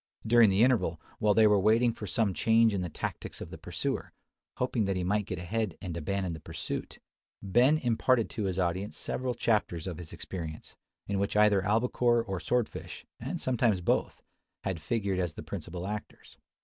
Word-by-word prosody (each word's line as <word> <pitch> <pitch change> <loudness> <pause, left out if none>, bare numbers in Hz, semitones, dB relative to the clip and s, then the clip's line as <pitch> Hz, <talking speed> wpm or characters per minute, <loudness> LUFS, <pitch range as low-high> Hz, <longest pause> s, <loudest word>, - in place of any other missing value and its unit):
During 115 -1 +6
the 100 +3 +4
interval, 120 -11 +2 0.2
while 105 -1 +3
they 110 - +6
were 105 -1 +5
waiting 115 +4 +4
for 105 - -7
some 100 +2 +1
change 115 +2 +4
in 95 - -1
the 90 - -3
tactics - - -5
of - - -8
the - - -7
pursuer, - - -3 0.5
hoping 125 -4 0
that 95 0 0
he 90 - -1
might 105 +2 0
get 90 - -3
ahead 95 +2 -2
and 90 -5 -5
abandon 90 +2 -2
the 80 - -7
pursuit, 80 0 -5 0.5
Ben 125 +10 +4
imparted 120 -2 +2
to 105 - -2
his 95 -1 -2
audience 95 +2 -1
several 125 -1 -2
chapters 105 -7 0
of 90 -4 -5
his 85 -2 -9
experience, 80 -4 -7 0.3
in 100 -1 -1
which 100 +1 0
either 105 -2 +5
albacore 120 +3 +2
or 95 -5 -4
sword 125 +2 +1
fish, - - -9
and - - -4
sometimes 120 -6 +2
both, 90 - 0 0.4
had 95 -4 -3
figured 100 -1 -1
as 90 -3 -1
the - - -7
principal 85 +1 -6
actors. 105 +1 -7
100 Hz, 190 wpm, -30 LUFS, 90-115 Hz, 0.5 s, During